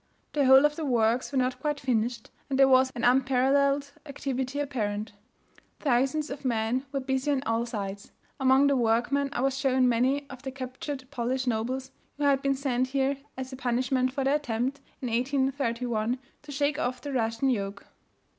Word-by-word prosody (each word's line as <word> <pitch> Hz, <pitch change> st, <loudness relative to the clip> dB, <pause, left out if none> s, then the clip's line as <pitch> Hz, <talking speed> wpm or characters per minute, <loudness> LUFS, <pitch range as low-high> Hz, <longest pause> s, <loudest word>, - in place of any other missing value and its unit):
The 285 Hz, -3 st, +2 dB
whole 265 Hz, +2 st, +8 dB
of 295 Hz, 0 st, +2 dB
the 325 Hz, -, -3 dB
works 240 Hz, -2 st, +1 dB
were 275 Hz, -, -1 dB
not 255 Hz, 0 st, 0 dB
quite 295 Hz, +1 st, -1 dB
finished, 235 Hz, -2 st, -1 dB, 0.2 s
and 270 Hz, -, 0 dB
there 270 Hz, 0 st, +6 dB
was 260 Hz, 0 st, +5 dB
an 235 Hz, -, -4 dB
unparalleled 270 Hz, +2 st, +3 dB, 0.2 s
activity 270 Hz, -1 st, -3 dB
apparent. 215 Hz, -7 st, -2 dB, 0.7 s
Thousands 275 Hz, +3 st, +1 dB
of 280 Hz, 0 st, -7 dB
men 245 Hz, +2 st, 0 dB
were 275 Hz, -, -1 dB
busy 265 Hz, +1 st, -1 dB
on 275 Hz, -2 st, +1 dB
all 230 Hz, 0 st, 0 dB
sides. 200 Hz, -3 st, -5 dB, 0.3 s
Among 265 Hz, +1 st, +5 dB
the 280 Hz, 0 st, +3 dB
workmen 245 Hz, +4 st, +1 dB
I -, -, -2 dB
was 270 Hz, 0 st, +1 dB
shown 260 Hz, -2 st, +3 dB
many 260 Hz, +4 st, +1 dB
of 265 Hz, -2 st, -10 dB
the 270 Hz, -, -5 dB
captured 260 Hz, +1 st, -6 dB
Polish 255 Hz, 0 st, -1 dB
nobles 250 Hz, +3 st, -2 dB, 0.3 s
who 295 Hz, -, -3 dB
had 280 Hz, -1 st, +3 dB
been 275 Hz, 0 st, +1 dB
sent 260 Hz, -2 st, 0 dB
here 270 Hz, +1 st, 0 dB, 0.2 s
as 260 Hz, 0 st, -6 dB
a -, -, -4 dB
punishment 255 Hz, 0 st, 0 dB
for 270 Hz, +1 st, -2 dB
their 275 Hz, +2 st, +3 dB
attempt, 260 Hz, 0 st, -2 dB, 0.2 s
in -, -, -1 dB
1831, 245 Hz, -2 st, 0 dB, 0.2 s
to 295 Hz, -, -11 dB
shake 285 Hz, +1 st, 0 dB
of 250 Hz, +1 st, -1 dB
the 285 Hz, -1 st, -5 dB
Russian 230 Hz, +2 st, +1 dB
yoke. 200 Hz, -3 st, -3 dB
260 Hz, 180 wpm, -28 LUFS, 245-275 Hz, 0.7 s, whole